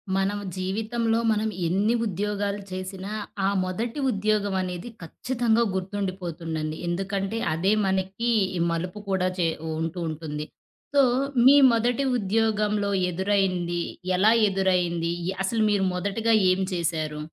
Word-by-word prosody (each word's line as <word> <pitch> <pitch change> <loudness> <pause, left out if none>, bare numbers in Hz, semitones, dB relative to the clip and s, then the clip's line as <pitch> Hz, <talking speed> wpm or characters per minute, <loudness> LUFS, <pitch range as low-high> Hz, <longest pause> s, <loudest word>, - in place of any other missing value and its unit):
మనం 195 +1 0 0.2
జీవితంలో 225 +4 -1
మనం 220 0 0 0.2
ఎన్ని 205 +7 +2
ఉద్యోగాలు 205 +1 -2
చేసినా, 185 +1 -6 0.4
ఆ - - +3
మొదటి 225 +9 -3
ఉద్యోగం 205 -1 0
అనేది 180 +3 -5
ఖచ్చితంగా 235 +6 0
గుర్తుండిపోతుందండి. 180 -5 -3
ఎందుకంటే, 195 +4 -2 0.2
అదే 185 +6 +2
మనకి 190 +4 -1 0.3
ఈ - - -2
మలుపు 180 +5 -3
కూడా 185 -1 +1
చె 170 - +3 0.3
ఉంటూ 165 +2 -3
ఉంటుంది. 150 -1 -5 0.5
సో, 280 - +7 0.5
మీ 275 - +8 0.2
మొదటి 240 +4 +1 0.2
ఉద్యోగంలో 210 0 +1 0.2
ఎదురైంది? 185 -2 0 0.4
ఎలా 210 +4 +5 0.2
ఎదురైంది? 180 -3 +1 0.2
ఇ - - +1
అసలు 220 +3 +1
మీరు 200 -2 +2
మొదటిగా 210 +5 +1 0.2
ఏం 185 +1 +1
చేశారు? 160 -3 -2
195 Hz, 120 wpm, -25 LUFS, 180-215 Hz, 0.5 s, మీ